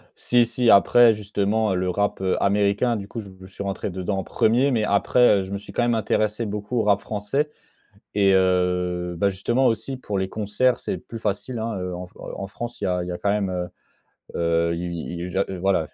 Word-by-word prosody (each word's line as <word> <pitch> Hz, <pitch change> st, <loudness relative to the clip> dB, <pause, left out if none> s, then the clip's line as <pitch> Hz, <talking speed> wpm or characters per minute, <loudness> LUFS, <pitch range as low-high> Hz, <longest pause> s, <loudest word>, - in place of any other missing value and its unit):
Si, 120 Hz, -1 st, +3 dB
si. 120 Hz, +1 st, +1 dB
Après, 115 Hz, +3 st, +7 dB
justement, 105 Hz, 0 st, 0 dB
le 90 Hz, 0 st, 0 dB
rap, 100 Hz, +2 st, -1 dB
heu, 95 Hz, -1 st, +1 dB
américain, 105 Hz, +4 st, +2 dB
du 100 Hz, -, -7 dB
coup, 115 Hz, -, -6 dB
je 95 Hz, -3 st, -11 dB
suis 100 Hz, -, -7 dB
rentré 100 Hz, +1 st, -3 dB
dedans 95 Hz, +2 st, -3 dB
en 95 Hz, -, -3 dB
1er. 120 Hz, +5 st, +2 dB
Mais 115 Hz, -5 st, +1 dB
après, 105 Hz, +2 st, +4 dB
heu, 95 Hz, -, -2 dB
je 95 Hz, -, -8 dB
me 100 Hz, -, -2 dB
suis 100 Hz, -, -11 dB
quand -, -, 0 dB
même 120 Hz, -1 st, +2 dB
intéressé 110 Hz, 0 st, 0 dB
beaucoup 105 Hz, +3 st, -4 dB
au -, -, +2 dB
rap 100 Hz, -1 st, +3 dB
français. 110 Hz, +8 st, -2 dB, 0.7 s
Et 100 Hz, -1 st, +4 dB
heu, 90 Hz, -1 st, +1 dB
bah 100 Hz, +3 st, +2 dB
justement 120 Hz, +7 st, +1 dB
aussi 115 Hz, +4 st, -1 dB
pour 105 Hz, -6 st, -4 dB
les 95 Hz, 0 st, -1 dB
concerts, 110 Hz, +5 st, 0 dB
c'est -, -, -3 dB
plus 115 Hz, +5 st, -9 dB
facile, 110 Hz, +4 st, -3 dB
hein. 110 Hz, -3 st, -3 dB
Heu, 90 Hz, 0 st, -4 dB
en 90 Hz, +1 st, -6 dB
f -, -, -23 dB
heu, -, -, -8 dB
en 100 Hz, -, -4 dB
France, 120 Hz, +3 st, -7 dB
il -, -, 0 dB
y -, -, +1 dB
a 90 Hz, -1 st, 0 dB
il 90 Hz, -, -6 dB
y 90 Hz, -, -3 dB
a 90 Hz, -, -5 dB
quand 100 Hz, -, 0 dB
même, 100 Hz, -2 st, 0 dB
heu 90 Hz, -1 st, -3 dB, 0.7 s
heu, 85 Hz, 0 st, +1 dB
il 85 Hz, 0 st, -4 dB, 0.3 s
i -, -, -3 dB
i -, -, -5 dB
j'a 95 Hz, +2 st, +1 dB
heu, 95 Hz, -, -5 dB
voilà, 90 Hz, -4 st, +1 dB
100 Hz, 235 wpm, -23 LUFS, 95-110 Hz, 0.7 s, Après